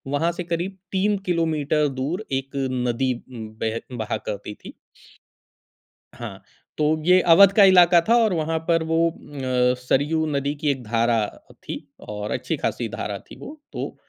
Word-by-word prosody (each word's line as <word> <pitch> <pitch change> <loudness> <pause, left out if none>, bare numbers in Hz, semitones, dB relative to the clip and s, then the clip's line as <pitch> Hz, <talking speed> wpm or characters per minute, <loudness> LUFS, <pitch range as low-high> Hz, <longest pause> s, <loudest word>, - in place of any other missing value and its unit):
वहाँ 165 +4 +1
से 180 - -3
करीब 175 +3 -3
3 200 +2 +1
किलोमीटर 155 -3 +1
दूर 175 +11 -2
एक 135 0 -11 0.4
नदी 125 +2 0 0.5
बेह 115 +1 -1 0.2
बहा 110 0 -2
करती 105 +1 -5
थी। - - -9 1.4
हाँ, - - -8 0.4
तो 150 - +1 0.2
ये 180 +1 +6
अवध 200 +2 +8
का 200 - +8
इलाका 175 -1 +7
था 235 - +6
और 210 -4 +2
वहाँ 160 0 -1
पर 165 -1 +2
वो 165 - +3
अ, 130 -5 -1
सरयू 150 +5 +1
नदी 140 +1 -1
की 150 - +2
एक 130 -3 -5
धारा 115 +1 +1 0.5
थी - - -5 0.3
और 105 0 -5
अच्छी - - -2
खासी - - -2
धारा - - -4
थी - - -15
वो, 305 +1 -10
तो - - -5
155 Hz, 160 wpm, -23 LUFS, 125-175 Hz, 1.4 s, अवध